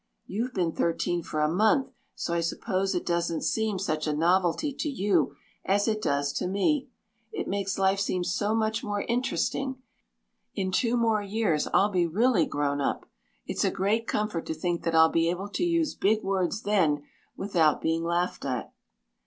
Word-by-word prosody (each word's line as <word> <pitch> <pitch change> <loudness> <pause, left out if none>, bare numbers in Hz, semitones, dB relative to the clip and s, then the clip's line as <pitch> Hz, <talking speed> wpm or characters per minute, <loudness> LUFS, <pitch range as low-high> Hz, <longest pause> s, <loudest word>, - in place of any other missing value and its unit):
You've 235 +6 -3
been 175 -4 +1
thirteen 170 +1 0
for 155 -1 -3
a 150 - +3
month, 215 - +2 0.2
so 170 - -3
I 170 - +1
suppose 190 +3 -1
it 175 - -2
doesn't 170 -1 -1
seem 220 -3 0
such 155 -5 -2
a 150 - +1
novelty 180 - +2
to 300 - -3
you 190 - +1 0.3
as 200 +1 +1
it 215 -1 0
does 140 -5 0
to - - -2
me. 260 - +1 0.4
It - - -4
makes 195 -1 -2
life 195 0 +2
seem 185 -2 0
so 210 +4 0
much 220 0 0
more 205 -1 -2
interesting. 260 +2 -1 0.8
In 190 -1 -1
two 235 +5 +1
more 225 -3 +2
years 200 -6 0
I'll 205 +2 +3
be 180 -3 +2
really 205 +1 +2
grown 145 0 -1
up. - - -1 0.4
It's - - -1
a - - +3
great 215 +4 0
comfort 210 -6 -2
to 160 - -2
think 170 +2 -2
that 165 -1 +1
I'll 160 0 +7
be 165 0 +2
able 185 +4 -3
to 205 - -2
use 335 -3 +1
big 215 +2 +1
words 195 +2 -1
then 165 -8 +2 0.3
without 170 -6 +2
being 165 +1 0
laughed 175 +1 -1
at." 130 -3 -3
190 Hz, 180 wpm, -27 LUFS, 165-215 Hz, 0.8 s, I'll